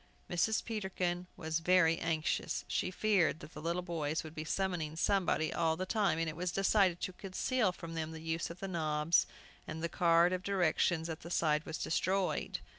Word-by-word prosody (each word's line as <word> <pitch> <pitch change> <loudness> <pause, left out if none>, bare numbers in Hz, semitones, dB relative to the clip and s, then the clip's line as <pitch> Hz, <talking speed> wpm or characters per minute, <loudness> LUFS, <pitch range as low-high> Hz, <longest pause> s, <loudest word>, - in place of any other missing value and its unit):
Mrs. 185 +6 +1
Peterkin 185 -5 -2
was 160 0 -1
very 165 -1 +4
anxious. 160 -1 -1
She - - -1
feared 185 -4 +2
the 150 - -10
little 170 +3 -1
boys 160 -3 -2
would 155 -1 -9
be 155 - -5
summoning 165 -2 -2
somebody 175 -3 +1
all 160 -1 +1
the 185 - -2
time, 195 -5 +1
and 165 0 0
it 155 - -4
was 180 +1 -2
decided 195 -2 +3
to 185 - -3
conceal 195 +4 0
from 165 -2 -8
them 160 -1 -3
the 160 - -7
use 165 +1 -2
of 170 +2 -10
the 195 - -3
knobs, 155 -2 +2 0.4
and 160 - -5
the 170 - 0
card 170 +1 +4
of 185 - -1
directions 175 -3 +1
at 160 -1 -5
the 170 - -9
side 155 -3 +1
was 160 - -3
destroyed. 190 +3 0
170 Hz, 190 wpm, -33 LUFS, 160-185 Hz, 0.4 s, very